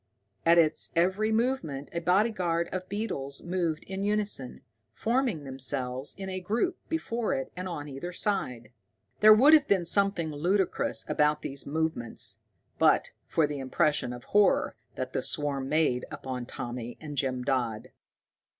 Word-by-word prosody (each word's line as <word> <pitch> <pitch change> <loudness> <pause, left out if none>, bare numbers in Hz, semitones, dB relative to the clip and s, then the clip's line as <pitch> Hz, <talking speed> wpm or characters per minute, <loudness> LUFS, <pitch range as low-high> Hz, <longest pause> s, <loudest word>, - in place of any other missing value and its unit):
At 170 +1 +7
its 155 -2 +3
every 190 +6 +2
movement 220 - -1
a 170 - -1
bodyguard 180 -2 +1
of 185 0 -5
beetles 140 -10 -3
moved 170 -3 -1
in 190 +1 -5
unison, 205 -10 -1 0.3
forming 235 - 0
themselves 130 0 -3
in 195 -1 -6
a 185 0 -3
group 230 - -1
before 240 -8 -1
it 135 - -4
and 185 +1 -4
on 150 -4 -5
either 140 +5 -6
side. 130 - -2 0.5
There 215 0 +8
would 280 +8 +7
have 300 -3 +6
been 190 -4 +2
something 195 -3 +2
ludicrous 180 +6 0
about 150 0 +2
these 140 0 -6
movements, 155 -6 0 0.4
but - - +4 0.2
for 160 - +2
the 145 -1 -4
impression 135 -1 +1
of 120 0 -8
horror 205 -1 +3 0.2
that - - -4
the - - 0
swarm 140 -4 -1
made 150 -6 +2
upon 125 -2 -5
Tommy 120 0 -6
and 150 -2 -7
Jim 130 -2 -1
Dodd. 120 -5 -1
165 Hz, 150 wpm, -28 LUFS, 135-200 Hz, 0.5 s, There